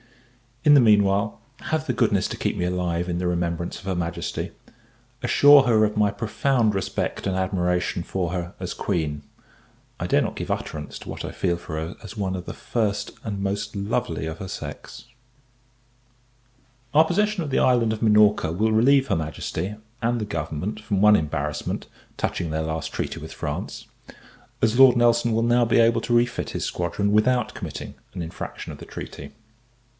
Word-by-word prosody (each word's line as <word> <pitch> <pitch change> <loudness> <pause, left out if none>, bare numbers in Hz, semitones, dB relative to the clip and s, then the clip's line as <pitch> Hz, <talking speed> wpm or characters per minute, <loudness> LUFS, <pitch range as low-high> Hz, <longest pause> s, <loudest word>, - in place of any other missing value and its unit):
In 150 - +7
the - - +8
meanwhile, 105 -2 +3 0.2
have 155 0 -1
the 130 - +1
goodness - - +2
to - - -6
keep - - -1
me 90 - -1
alive 90 -1 -1
in 85 - -1
the 90 - -1
remembrance 85 -1 -2
of 95 - -15
her 95 -1 -1
Majesty: 85 0 -3 0.7
assure 140 +3 +7
her 115 -4 +4
of 105 0 -3
my 105 -1 +4
profound 115 0 +1
respect 95 - -2
and 95 - 0
admiration 90 -2 0
for 90 0 -2
her 90 0 -4
as 90 -1 -4
Queen 80 -7 -2 0.8
I - - -2
dare - - +3
not - - -2
give - - -5
utterance 75 -1 -4
to - - -11
what - - -6
I - - -4
feel 85 -2 0
for 85 -2 -6
her 80 +3 -5
as 105 0 -9
one 95 -2 -1
of 90 -1 -6
the - - -6
first 110 -4 -2
and 100 -3 -4
most 100 +3 -2
lovely 100 -5 -2
of 80 0 -5
her 95 - -5
sex. - - -8 1.9
Our 155 +1 +7
possession 210 +2 +1
of 150 - -4
the - - +2
island 120 -3 +3
of 110 - -6
Minorca 105 -6 +4
will 110 +6 +1
relieve 135 +5 +4
her - - +1
Majesty, 80 +4 -3 0.3
and 120 +1 +1
the - - -1
government, 85 +3 -4
from 105 -3 -1
one 105 0 +7
embarrassment, 75 -3 -2 0.3
touching 85 - -2
their 80 0 -1
last 80 -1 -3
treaty - - -3
with - - -8
France; 75 0 -5 0.8
as 115 +3 +3
Lord 130 -2 +8
Nelson 120 0 +3
will 115 +1 +1
now 120 +1 +4
be 115 - +3
able 115 0 +4
to 120 +1 -2
refit 120 0 +1
his - - -3
squadron, 90 +4 -1
without 110 +2 +2
committing - - -6 0.2
an 90 - -3
infraction 80 - -7
of - - -10
the - - -9
treaty. 70 0 -8
100 Hz, 180 wpm, -24 LUFS, 85-115 Hz, 1.9 s, the